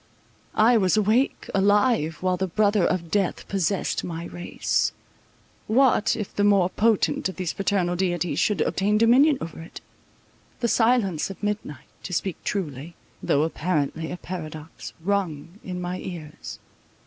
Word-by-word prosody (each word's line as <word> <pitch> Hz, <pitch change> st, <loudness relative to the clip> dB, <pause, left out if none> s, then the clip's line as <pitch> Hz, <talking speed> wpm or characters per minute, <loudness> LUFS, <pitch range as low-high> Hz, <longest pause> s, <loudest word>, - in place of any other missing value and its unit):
I 230 Hz, +2 st, +5 dB
was 190 Hz, 0 st, +2 dB
awake, 215 Hz, +6 st, +1 dB
alive, 200 Hz, -4 st, +2 dB
while 185 Hz, -1 st, +2 dB
the 190 Hz, +1 st, -2 dB
brother 205 Hz, +2 st, +2 dB
of 170 Hz, -3 st, -1 dB
death 200 Hz, -3 st, 0 dB
possessed 195 Hz, -1 st, -1 dB
my 170 Hz, -1 st, -5 dB
race. 175 Hz, 0 st, -1 dB, 0.7 s
What, 245 Hz, -1 st, +3 dB
if 210 Hz, -3 st, -6 dB
the 205 Hz, -, +1 dB
more 195 Hz, -3 st, +4 dB
potent 220 Hz, -3 st, +1 dB
of 190 Hz, -, -8 dB
these 185 Hz, -3 st, -3 dB
fraternal 195 Hz, -3 st, 0 dB
deities 175 Hz, -4 st, -1 dB
should 200 Hz, -4 st, +1 dB
obtain 205 Hz, +2 st, +1 dB
dominion 260 Hz, +6 st, +5 dB
over 165 Hz, 0 st, -7 dB
it? 165 Hz, -, -10 dB, 0.8 s
The 235 Hz, -, +1 dB
silence 225 Hz, -9 st, +2 dB
of 195 Hz, -, -10 dB
midnight, 205 Hz, -, -3 dB, 0.2 s
to 185 Hz, -, -7 dB
speak 185 Hz, +1 st, -2 dB
truly, 160 Hz, -4 st, -4 dB, 0.3 s
though 145 Hz, -, +2 dB
apparently 160 Hz, -1 st, -1 dB
a 180 Hz, -, -5 dB
paradox, 160 Hz, -3 st, -8 dB
rung 180 Hz, -2 st, -2 dB
in 180 Hz, -1 st, -5 dB
my 180 Hz, +1 st, -4 dB
ears. 160 Hz, -5 st, -8 dB
185 Hz, 145 wpm, -24 LUFS, 170-210 Hz, 0.8 s, I